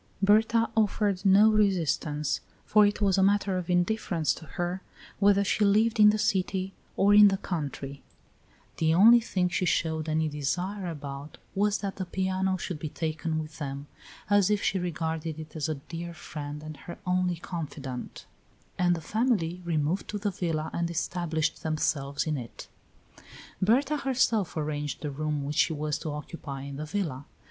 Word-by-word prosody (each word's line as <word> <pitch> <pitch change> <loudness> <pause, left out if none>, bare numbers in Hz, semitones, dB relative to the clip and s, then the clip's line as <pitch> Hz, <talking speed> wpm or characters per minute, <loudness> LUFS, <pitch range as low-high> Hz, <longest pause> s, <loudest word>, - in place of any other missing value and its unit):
Berta 220 +3 +4
offered 205 -3 +1
no 205 +2 +6
resistance, 160 -8 +1 0.2
for 210 -1 +5
it 205 - -2
was 195 -1 +3
a - - +4
matter 195 -1 +2
of 180 - -7
indifference 175 -3 +1
to 160 - -10
her 175 +2 -2 0.4
whether 200 0 +4
she 205 +2 +1
lived 215 +3 +3
in 210 0 +9
the 215 - +2
city 190 -2 0 0.2
or 200 +1 +5
in 210 0 +9
the 195 -1 +2
country; 145 -6 -5 0.8
the 160 0 +2
only 230 +6 +8
thing 185 -5 0
she 180 +1 -1
showed 160 -2 0
any 155 0 +1
desire 180 +7 -2
about 145 -2 -7 0.2
was 205 +1 +2
that 200 -2 -5
the 190 - -3
piano 190 +1 -1
should 175 -3 -5
be 155 - -4
taken 160 +1 -2
with 155 -1 -6
them, 140 -1 -5 0.4
as 205 -1 +4
if 210 -1 +1
she 190 - +1
regarded 160 -2 -3
it 155 +1 -10
as 155 0 -2
a 155 - -1
dear 170 +4 -7
friend 150 -2 -7
and 155 -1 -8
her 170 +5 -9
only 180 -1 +1
confidant; 150 -7 -6 0.5
and 175 -1 +3
the 165 - -6
family 190 -4 0
removed 165 +2 0
to 210 - -3
the 205 0 -1
villa 160 -4 -2
and 170 0 -1
established 165 -2 -1
themselves 150 -3 -1
in 155 -2 -1
it. 120 -3 -8 0.9
Berta 260 +9 +3
herself 235 - +1
arranged 150 -1 -3
the 150 - -2
room 150 0 -2
which 145 +2 -4
she 160 - +3
was 150 -1 -2
to 155 - -5
occupy 145 -2 -6
in 140 0 -7
the 155 - -4
villa. 150 -8 -3
175 Hz, 170 wpm, -28 LUFS, 155-200 Hz, 0.9 s, in